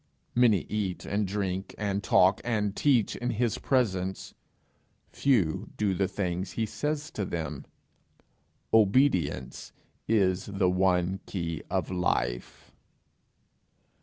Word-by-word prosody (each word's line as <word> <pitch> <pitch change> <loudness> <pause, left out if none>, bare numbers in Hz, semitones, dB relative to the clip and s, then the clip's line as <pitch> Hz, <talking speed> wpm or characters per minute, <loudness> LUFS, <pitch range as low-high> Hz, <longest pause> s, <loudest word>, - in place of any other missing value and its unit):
Many 120 -6 +4
eat 100 -4 -3
and 100 0 -1
drink 95 -1 -3
and 100 -1 -2
talk 95 +1 +4
and 105 -4 -1
teach 125 -8 +2
in 120 - -3
his 120 -1 0
presence; 95 -8 -1 0.8
few 110 - +1
do 105 -2 +1
the 95 +1 +1
things 90 -2 -3
he 115 - -1
says 150 +7 -3
to 105 - -3
them! 80 -6 -4 1.1
Obedience 100 - +2 0.4
is 95 -5 +2
the 95 -2 +1
one 90 0 +1
key 85 -4 -3
of - - -1
life. - - -2
95 Hz, 110 wpm, -28 LUFS, 90-110 Hz, 1.1 s, Many